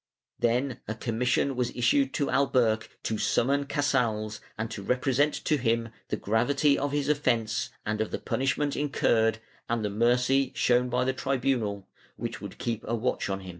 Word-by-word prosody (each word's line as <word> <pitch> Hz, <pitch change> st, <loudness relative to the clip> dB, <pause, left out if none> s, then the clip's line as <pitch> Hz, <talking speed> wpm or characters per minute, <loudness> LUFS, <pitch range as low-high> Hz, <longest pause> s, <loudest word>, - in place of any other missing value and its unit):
Then 125 Hz, +2 st, +1 dB
a 110 Hz, -, -3 dB
commission 125 Hz, +4 st, 0 dB
was 125 Hz, -1 st, 0 dB
issued 130 Hz, +3 st, +2 dB
to 140 Hz, -, 0 dB
Alberch 125 Hz, -5 st, +2 dB
to 110 Hz, -1 st, -2 dB
summon 140 Hz, +3 st, +2 dB
Casals 115 Hz, -7 st, 0 dB, 0.2 s
and 110 Hz, +1 st, -3 dB
to 100 Hz, -, -5 dB
represent 130 Hz, +6 st, +1 dB
to 155 Hz, -, +3 dB
him 115 Hz, -2 st, 0 dB, 0.2 s
the -, -, -2 dB
gravity 140 Hz, +7 st, +2 dB
of 140 Hz, 0 st, -1 dB
his 145 Hz, -1 st, 0 dB
offence 125 Hz, -5 st, +1 dB, 0.2 s
and 105 Hz, 0 st, -1 dB
of 110 Hz, -, -1 dB
the -, -, -3 dB
punishment 140 Hz, +2 st, -1 dB
incurred, 115 Hz, -6 st, +2 dB, 0.3 s
and 115 Hz, -2 st, 0 dB
the 105 Hz, -, -1 dB
mercy 125 Hz, +5 st, +2 dB
shown 125 Hz, 0 st, +3 dB
by 125 Hz, +1 st, +1 dB
the 130 Hz, +1 st, 0 dB
tribunal, 125 Hz, -7 st, -1 dB, 0.3 s
which -, -, -5 dB
would -, -, -8 dB
keep 115 Hz, -2 st, -3 dB
a 115 Hz, -, 0 dB
watch 115 Hz, -2 st, -1 dB
on 95 Hz, 0 st, -2 dB
him. 95 Hz, -, -9 dB
125 Hz, 170 wpm, -28 LUFS, 110-135 Hz, 0.3 s, to